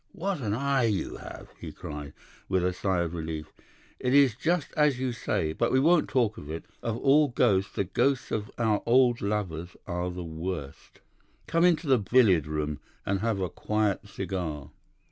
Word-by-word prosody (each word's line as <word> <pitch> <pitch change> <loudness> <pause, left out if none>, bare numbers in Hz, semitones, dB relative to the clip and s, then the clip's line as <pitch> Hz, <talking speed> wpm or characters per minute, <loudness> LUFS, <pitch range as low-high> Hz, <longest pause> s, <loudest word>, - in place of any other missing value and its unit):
"What 195 -3 -2
an 105 -3 -1
eye 135 0 +1
you 105 -4 -1
have!" - - -10
he - - -7
cried, 75 -1 -7 0.4
with 95 -2 +2
a 90 - +1
sigh 95 -1 0
of 85 -1 -2
relief. 80 -2 -5 0.5
'It 125 +2 +1
is 140 -4 +6
just 165 +3 0
as 150 -4 +3
you 130 -1 -1
say. 80 -9 -1
But - - 0
we 130 - +4
won't 165 +3 +4
talk 120 -5 +1
of 75 - -10
it. 80 +1 -5 0.2
Of 115 -1 -2
all 145 +4 +4
ghosts 105 -6 +1
the - - +1
ghosts 135 +7 0
of 105 -1 -2
our 110 -3 +1
old 120 0 +4
lovers 90 -5 -3
are 90 0 -2
the 90 0 -5
worst. 80 -3 -6 0.4
Come 165 +1 +1
into 175 -1 +3
the 130 -4 +4
billiard 100 - +4
room 75 -2 -2 0.3
and 100 0 0
have 110 -2 0
a 95 - 0
quiet 105 +1 -1
cigar. 90 -7 -4
105 Hz, 185 wpm, -28 LUFS, 85-130 Hz, 0.5 s, is